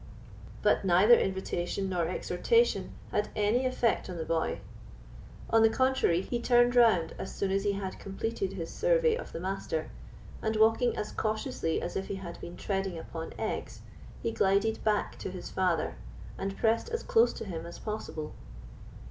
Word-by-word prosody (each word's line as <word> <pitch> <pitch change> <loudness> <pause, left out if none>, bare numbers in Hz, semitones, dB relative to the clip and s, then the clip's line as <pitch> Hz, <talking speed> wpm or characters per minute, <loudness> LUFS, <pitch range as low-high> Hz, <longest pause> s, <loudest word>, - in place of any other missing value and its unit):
But - - +3
neither 190 +5 +6
invitation 190 -2 0
nor 175 -3 0
exhortation 460 - +1 0.2
had 210 - 0
any 220 +5 +2
effect 240 -5 0
on 180 - -5
the 160 - -3
boy. 165 -1 0 0.9
On 225 - +5
the 225 - +6
contrary, 260 -8 +2
he 240 - -2
turned 240 0 +4
round 220 -9 +5
as - - -5
soon 195 -1 -1
as 195 0 +1
he 205 - +2
had 195 -1 -5
completed 195 0 -3
his 170 -4 -5
survey - - +3
of - - -7
the - - -5
Master, 180 -3 -3 0.5
and 220 0 -1
walking 225 +3 +3
as 210 - -3
cautiously 215 -6 -1
as 175 - -4
if 195 - -2
he - - -3
had 180 -3 -8
been 175 - -8
treading 195 -3 -2
upon 165 0 -7
eggs, - - -4 0.4
he 230 - 0
glided 200 +2 +1
back 210 -1 0
to - - -4
his 180 -1 -7
father, 180 -3 +1 0.4
and 195 0 -4
pressed 230 - +1
as 460 0 -3
close 230 +2 +4
to - - -6
him 170 -4 -5
as 170 - -9
possible. 210 -8 -5
200 Hz, 170 wpm, -30 LUFS, 180-230 Hz, 0.9 s, neither